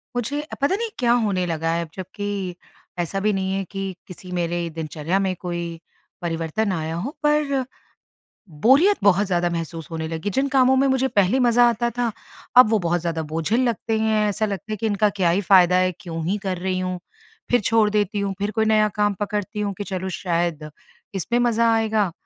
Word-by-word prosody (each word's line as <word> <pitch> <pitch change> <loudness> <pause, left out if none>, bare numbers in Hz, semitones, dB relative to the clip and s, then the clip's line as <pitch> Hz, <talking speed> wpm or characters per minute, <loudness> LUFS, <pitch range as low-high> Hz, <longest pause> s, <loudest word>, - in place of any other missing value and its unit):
मुझे 280 +5 -2 0.2
पता 285 +7 +2
नहीं 460 +2 -3
क्या 240 -1 +3
होने 185 -3 0
लगा 165 -1 -1
हैं? 170 - 0
अब - - -18
जबकि 190 -1 -4 0.4
ऐसा 175 +3 -1
भी 210 +1 +1
नहीं 190 0 -1
है 195 - -1
कि 195 -1 -4
किसी 180 -1 -11
मेरे 170 0 -1
दिनचर्या 160 +3 -2
में 190 -2 0
कोई 170 -2 -4 0.4
परिवर्तन 170 +5 -1
आया 160 -2 -3
हो 200 +12 -3
पर, 295 -3 +2 0.8
बोरियत 270 - +4
बहुत 200 0 +4
ज़्यादा 175 -2 +1
महसूस 165 -1 -5
होने 160 -1 -3
लगी। 165 +5 -3
जिन 270 +8 0
कामों 260 0 +5
में 275 +1 +3
मुझे 265 0 +2
पहले 200 +1 +2
मज़ा 240 -1 +5
आता 235 +1 0
था, 240 -2 +1 0.5
अब 250 -4 +9
वो 220 -2 +3
बहुत 175 -1 0
ज़्यादा 165 -1 -2
बोझिल 165 +10 0
लगते 225 0 -2
हैं, 220 -1 +2
ऐसा 215 +2 0
लगता 205 +1 -5
है - - -3
कि 225 - -3
इनका 210 0 +2
क्या 175 -2 +3
ही 185 +4 +1
फ़ायदा 180 -2 +5
है, 185 0 +2
क्यों 165 -5 -5
ही 200 +3 0
कर 185 -2 -2
रही 185 +1 -2
हूँ? 185 0 -3 0.5
फिर 245 -2 +4
छोड़ 220 0 +3
देती 210 -1 0
हूँ, 200 -1 -1
फिर 205 +1 -1
कोई 220 +1 +1
नया 215 -1 +4
काम 205 -1 +2
पकड़ती 205 0 -3
हूँ 200 -1 -1
कि 205 - -3
चलो 190 -1 -4
शायद 170 -4 -1 0.5
इसमें 215 +6 0
मज़ा 230 -1 +3
आएगा, 220 -4 +1
195 Hz, 200 wpm, -22 LUFS, 175-220 Hz, 0.8 s, अब